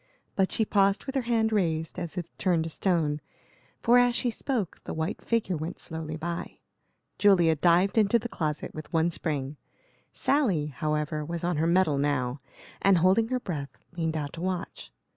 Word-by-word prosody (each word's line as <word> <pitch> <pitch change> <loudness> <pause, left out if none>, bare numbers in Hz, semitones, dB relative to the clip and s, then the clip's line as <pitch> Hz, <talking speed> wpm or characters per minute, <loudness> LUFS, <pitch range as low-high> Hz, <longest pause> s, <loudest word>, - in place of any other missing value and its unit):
But 190 -1 +2
she 220 - +2
paused 195 -1 +2
with 270 - -4
her 270 - +1
hand 225 -2 +2
raised, 165 -4 0
as 170 -2 -6
if 170 -2 -5
turned 175 -4 +2
to 165 - -4
stone, 155 -5 0 0.6
for 245 +1 +6
as 245 -1 +3
she 245 - 0
spoke 230 - -3
the - - -5
white 160 +5 -3
figure 225 -6 0
went 160 +4 -5
slowly 160 -1 -5
by. 170 +2 -5 0.6
Julia 175 -6 +5
dived 175 +7 +3
into 215 +2 +4
the 235 +1 -4
closet, 155 -8 -3
with 155 -1 -8
one 165 +1 +2
spring. 150 -3 -3 0.5
Sally, 220 - +1
however, 150 +2 -2
was 170 +2 -5
on 175 -2 0
her 160 +2 +2
mettle 170 -5 +3
now, 140 -2 0 0.4
and, 195 -2 +5
holding 190 +6 +4
her 255 +1 -1
breath, 150 - -5 0.2
leaned 160 -2 -1
out 145 -2 -4
to 165 - -7
watch. 180 - -4
170 Hz, 180 wpm, -28 LUFS, 155-200 Hz, 0.6 s, for